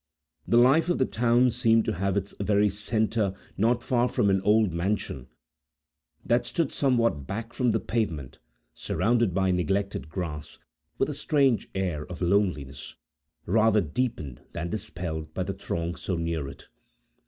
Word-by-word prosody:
The 115 - +4
life 135 +8 +5
of 175 - +2
the 130 - +2
town 120 +2 +3
seemed 115 -2 +3
to - - 0
have 100 +2 -1
its 100 0 -3
very 105 +1 +3
centre 110 -1 0 0.2
not 120 +3 +1
far 125 -1 +1
from 100 - +2
an 95 -1 +2
old 105 -2 +3
mansion, 85 -7 -2 1.0
that 120 +1 +2
stood 165 -5 -1
somewhat 115 - +1
back 115 +3 -5
from 125 -2 +1
the 110 0 +2
pavement, 85 - -3 0.3
surrounded 115 -3 +1
by 95 +1 +1
neglected 95 -1 -1
grass, 80 -4 -5 0.4
with - - +1
a - - -3
strange 135 -6 +1
air 90 -6 -1
of 90 - -8
loneliness, 85 -8 -1 0.5
rather 110 +3 +4
deepened 80 - -3
than 85 0 -4
dispelled 85 -6 -5
by - - 0
the - - -3
throng 85 +1 -3
so 90 +1 -3
near 85 -3 -2
it. 70 0 -11
100 Hz, 155 wpm, -27 LUFS, 85-115 Hz, 1.0 s, life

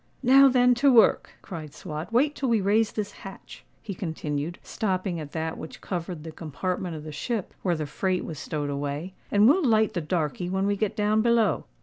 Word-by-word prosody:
"Now 270 +2 +7
then 250 -1 +4
to 280 -1 +6
work," 230 -4 +4
cried 155 -5 -8
Swot. 155 +1 -6
"Wait 280 +6 +3
till 270 -3 -2
we 230 -2 +3
raise 210 +3 +2
this 205 -1 -3
hatch," 195 -1 -11 0.2
he 205 - -5
continued, 160 -2 -4
stopping 185 -4 -2
at 150 -2 -7
that 160 0 -3
which 160 - -9
covered 175 -3 -5
the 160 - -7
compartment 175 +3 -4
of 150 - -7
the 155 - -7
ship 200 +7 -3
where 180 -3 +1
the 155 -1 -3
freight 185 +5 -1
was 155 -3 -6
stowed 145 -2 -3
away; 145 +5 -4 0.2
"and 205 +1 +5
we'll 330 +8 +4
light 220 -4 +3
the 175 - -1
darkey 165 +2 -2
when 190 +1 0
we 205 0 +1
get 205 0 -1
down 210 +1 +2
below. 235 -1 +2
185 Hz, 205 wpm, -26 LUFS, 160-220 Hz, 0.2 s, Now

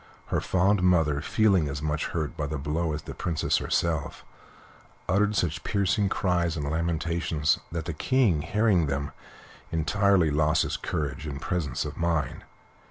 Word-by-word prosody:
Her - - +2
fond 95 +2 +2
mother, 80 -6 +3
feeling 95 -3 +2
as 70 0 -4
much 75 0 -1
hurt 80 -3 -3
by 75 - -3
the 75 +2 -3
blow 75 +4 -1
as 75 - -5
the - - -7
Princess 85 -4 0
herself, 80 -4 -1 0.8
uttered 105 +3 +2
such 80 -4 -1
piercing 100 0 +1
cries 85 -3 0
and 75 -2 -3
lamentations 80 -1 0
that 85 -1 -4
the 85 - -3
King, 105 - +2
hearing 105 -3 +2
them, 70 0 -2 0.6
entirely 90 +1 +2
lost 75 +1 +2
his - - -2
courage 75 0 -3
and 70 -2 -5
presence 80 -5 -2
of 75 - -6
mind. 80 -5 -1
80 Hz, 155 wpm, -27 LUFS, 75-90 Hz, 0.8 s, mother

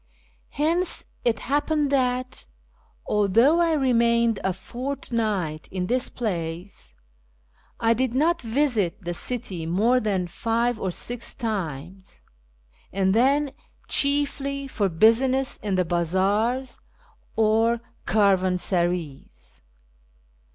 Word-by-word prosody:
Hence 335 +4 0 0.2
it 230 -2 +2
happened 290 +1 0
that, 255 -1 -1 0.6
although 230 - +3
I 335 -1 +3
remained 235 -5 +2
a 190 - +1
fortnight 215 - -3
in 185 -1 -3
this 250 +6 0
place, 175 -4 -5 0.9
I 230 0 +3
did 250 +1 -1
not 335 +5 +2
visit 225 - 0
the 175 0 -3
city 180 -5 -4
more 220 +9 +3
than 200 -5 -1
five 230 +5 -1
or 190 - -2
six 240 +6 -5
times, 190 - -5 0.7
and 190 0 +1
then 275 +5 +3 0.4
chiefly 280 -1 +1
for 205 -7 -1
business 255 +9 +3
in 200 -2 -1
the 185 -1 +1
bazaars 195 +9 0 0.6
or 225 +2 +3 0.3
caravansarays. 180 - 0
225 Hz, 100 wpm, -24 LUFS, 185-260 Hz, 0.9 s, although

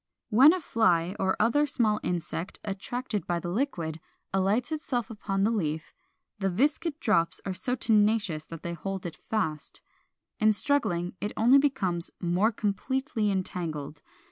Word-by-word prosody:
When 260 +8 +8
a 370 - 0
fly 185 - +2
or 190 0 +1
other 290 +6 +3
small 215 -5 +2
insect, 175 0 -3
attracted 210 +2 -4
by 175 -1 0
the 175 +1 -4
liquid, 175 - -2 0.3
alights 200 +8 +1 0.2
upon 210 -5 -1
the 220 - +3
leaf, 160 -7 -2 0.5
the 195 -1 +1
viscid 290 - 0
drops 180 - +1
are 195 - -2
so 220 +8 -1
tenacious 210 -8 +2
that 165 0 -9
they 170 - -3
hold 190 +3 -5
it 165 -2 -5
fast. 160 -9 -3 0.6
In 215 0 +5
struggling 205 -9 0
it 210 - -2
only 245 +5 +6
becomes 185 -12 0
more 180 +5 +2
completely 225 +3 -1
entangled. 165 -6 -3
200 Hz, 145 wpm, -28 LUFS, 175-235 Hz, 0.6 s, When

